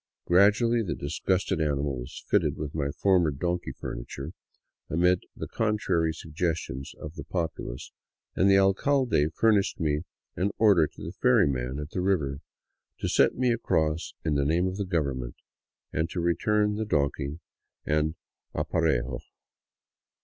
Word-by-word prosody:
Gradually 105 +6 +4
the 100 - -2
disgusted 95 -3 -1
animal 70 -2 0
was 60 +5 -9
fitted - - +2
with 75 -1 -5
my 70 -3 -1
former 90 +2 +3
donkey 85 +5 -2
furniture, 70 +5 -6 0.6
amid 90 +2 +2
the - - -5
contrary 105 -7 +1
suggestions 80 -4 -3
of 75 0 -7
the 80 - -7
pop 85 -3 -2
ulace, - - -7 0.4
and 95 - +4
the 95 - +6
alcalde 95 - +3
furnished 105 -3 +2
me 75 -2 +1 0.3
an 95 +2 +1
order 100 -8 +5
to - - -13
the - - -5
ferrymen 65 -1 +2
at 75 +1 -6
the 90 - -2
river 75 -8 0 0.6
to - - -2
set - - +3
me 125 -1 +2
across 80 -8 0
in 80 - +1
the 70 -1 +2
name 80 +5 +2
of 95 +1 -2
the 100 - -2
government 70 -9 -2 0.3
— - - -48
and 80 +2 0
to 90 - -4
return 105 +5 +1
donkey 70 -2 0 0.5
and 75 +1 +1 0.4
aparejo. 65 -6 0
80 Hz, 145 wpm, -27 LUFS, 75-95 Hz, 0.6 s, the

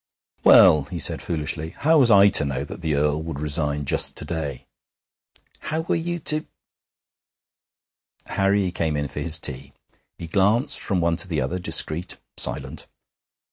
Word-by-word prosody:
'Well,' 75 -3 +5
he 85 - -8
said 80 - +3
foolishly, 80 0 -5
'how 160 +1 +2
was 125 -4 +5
I 100 -2 +5
to - - +4
know 70 -1 -4
that 70 - -11
the 80 -3 -2
Earl 75 +1 -1
would 80 -3 -8
resign 75 -1 -2
just - - +3
to - - -2
day?' 70 -6 -6 0.9
'How 160 +1 -4
were 160 - -3
you 175 - -3
to 155 +1 +2 1.0
?' - - -25
Harry 95 -1 0
came 80 -3 -3
in 75 0 -4
for - - -7
his 85 -1 +2
tea. 70 -3 -2 0.4
He 85 - -9
glanced 105 - +1
from 95 -4 -2
one 85 0 -1
to 90 - +3
the 80 -4 -3
other, 90 +4 -4
discreet, 85 0 +3 0.2
silent. - - -1
80 Hz, 165 wpm, -21 LUFS, 75-95 Hz, 1.0 s, Well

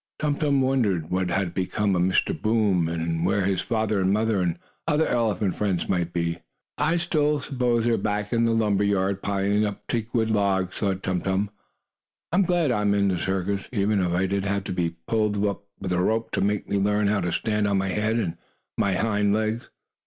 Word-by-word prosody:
Tum 150 -1 0
Tum 145 -2 +1
wondered 110 -12 +1
what 90 0 0
had 90 -1 -1
become 95 +2 0
of 90 - +1
Mr. 95 +1 +2
Boom 105 -7 +2
and 80 0 -2
where 95 +2 +1
his 95 -1 +1
father 110 -3 0
and 95 +1 +2
mother, 110 -1 +1
and 90 -2 +1
his 85 - -22 0.3
other 160 0 +3
elephant 105 -5 0
friends, 95 -5 -1
might 90 -2 0
be. 85 -1 -2 0.4
"I 155 +4 +1
suppose 150 -4 0
they 125 -3 -1
are 120 -1 +3
still 115 -1 +2
back 105 +1 -2
in 115 0 +3
the 115 - +2
lumber 105 -3 +2
yard, 100 -1 +1
piling 100 +1 +1
up 105 -1 -4
teakwood 115 -1 -1
logs," 95 -3 0
thought 95 -2 -1
Tum 90 -2 -1
Tum. 100 +1 -1 0.8
"I 175 - +1
am 195 - +4
glad 175 -5 +2
I 105 - +1
am 100 -1 +2
in 100 -1 +2
the 90 -2 0
circus, 95 +2 -2
even 105 -3 +1
if 90 -1 0
I 90 +2 +1
did 100 +1 -1
have 100 0 -1
to 95 - -4
be 85 -2 -1
pulled 105 -2 +1
up 100 0 -2
with 95 - -4
a 90 0 +2
rope 110 +4 0
to - - -1
make 105 +1 0
me 100 - 0
learn 105 +1 +2
how 100 0 +2
to 85 - -1
stand 105 +2 0
on 100 -1 +1
my 95 0 0
head 110 +3 0
and 95 -8 -2 0.4
my 100 -2 +2
hind 105 -1 +1
legs." 110 +2 -2
100 Hz, 220 wpm, -25 LUFS, 95-110 Hz, 0.8 s, am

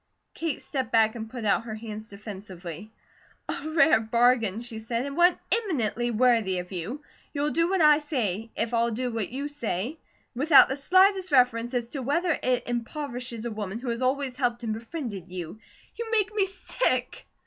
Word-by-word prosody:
Kate 325 -3 -3
stepped 265 -3 -3
back 220 -1 +4
and 225 -2 -6
put 235 -2 -6
out 210 +2 +2
her 220 -2 -5
hands 215 -1 -7
defensively: 195 -2 -9 0.6
"A 310 - -3
rare 315 -4 +5
bargain," 230 -2 +2
she 235 -2 -5
said, 230 +3 -2
"and 280 0 -5
one 350 +1 +5
eminently 245 - 0
worthy 230 -5 +3
of 180 +1 -5
you. 200 - -5 0.3
You'll 290 +1 0
do 335 +2 +2
what 380 -2 +1
I 300 -1 +7
say, 230 - -2
if 230 +1 -2
I'll 235 0 +2
do 245 +2 -2
what 225 -3 -2
you 275 +4 -4
say, 255 - -3 0.3
without 285 +3 +6
the 265 - -1
slightest 375 +5 +3
reference 245 -2 +3
as 240 -1 -2
to 275 - -4
whether 330 +7 +1
it 250 -1 0
impoverishes 240 -1 -4
a 235 - -2
woman 210 -1 -4
who 245 +1 -5
has 235 +1 -2
always 260 0 0
helped 245 -2 -1
and 220 -2 -1
befriended 225 - -6
you. 180 +2 -6 0.3
You 465 0 -5
make 430 -2 +1
me 400 -2 +2
sick!" 255 - -1
240 Hz, 180 wpm, -27 LUFS, 220-290 Hz, 0.6 s, I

